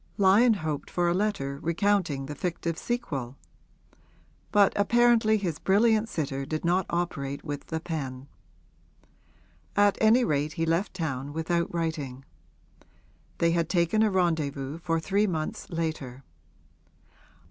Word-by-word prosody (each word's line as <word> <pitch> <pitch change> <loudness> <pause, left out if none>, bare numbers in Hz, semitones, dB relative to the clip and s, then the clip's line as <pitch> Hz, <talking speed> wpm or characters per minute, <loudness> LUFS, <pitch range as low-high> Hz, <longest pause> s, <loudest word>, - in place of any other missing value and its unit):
Lyon 210 +4 +5
hoped 155 -6 -4
for 175 -1 0
a 170 - +2
letter 175 -9 -1
recounting 170 -5 0
the 145 - -6
fictive 170 +1 -3
sequel; 140 - -4 1.1
but 205 -1 +5
apparently 225 +1 +4
his 175 -7 -3
brilliant 220 +3 +3
sitter 140 -6 -3
did 155 +4 -4
not 180 +2 +2
operate 140 -5 -3
with 145 -2 -5
the 160 - -3
pen. 140 -5 -5 1.5
At 205 0 +3
any 225 +3 +5
rate 150 -4 0
he 165 0 -1
left 170 +5 0
town 140 -5 -3
without 170 +2 -1
writing; 150 -6 -3 1.1
they 170 0 +2
had 170 -1 0
taken 175 +4 +2
a 220 - +4
rendezvous 155 -6 -1
for 165 -1 0
three 195 +6 +1
months 160 -4 -4
later. 155 -6 -4
165 Hz, 125 wpm, -27 LUFS, 145-200 Hz, 1.5 s, Lyon